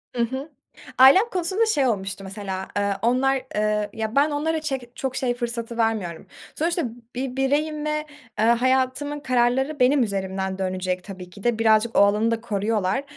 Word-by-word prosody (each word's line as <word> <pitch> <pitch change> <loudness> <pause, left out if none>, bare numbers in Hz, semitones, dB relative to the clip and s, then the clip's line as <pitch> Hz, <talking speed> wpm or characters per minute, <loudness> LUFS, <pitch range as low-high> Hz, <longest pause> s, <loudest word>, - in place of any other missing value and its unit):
Hı 240 - 0
hı. 265 +6 -4 0.5
Ailem 280 - +7
konusunda 375 +4 0
şey 290 -12 +2
olmuştu 195 -3 -2
mesela: 190 -1 -5
Eee, 200 0 +1
onlar, 255 +3 +2 0.2
eee, 210 0 0
ya 220 0 -4
ben 290 +2 +4
onlara 315 +2 -1
çek 265 -5 -5
çok 265 -1 -3
şey 250 -2 0
fırsatı 235 -1 -4
vermiyorum. 220 -8 -1 0.3
Sonuçta 335 +2 0 0.3
bir 255 0 -3
bireyim 295 +3 0
ve, 305 0 -1 0.3
eee, 220 - +3
hayatımın 260 +4 +1
kararları 265 +1 +1
benim 255 +1 +4
üzerimden 190 -2 -3
dönecek 185 -1 -2
tabii 185 -2 -9
ki 195 +3 -14
de. 240 -2 +1
Birazcık 220 0 +3
o - - +7
alanı 210 +3 +4
da 230 0 -1
koruyorlar 210 +1 -1
240 Hz, 165 wpm, -23 LUFS, 205-270 Hz, 0.5 s, Ailem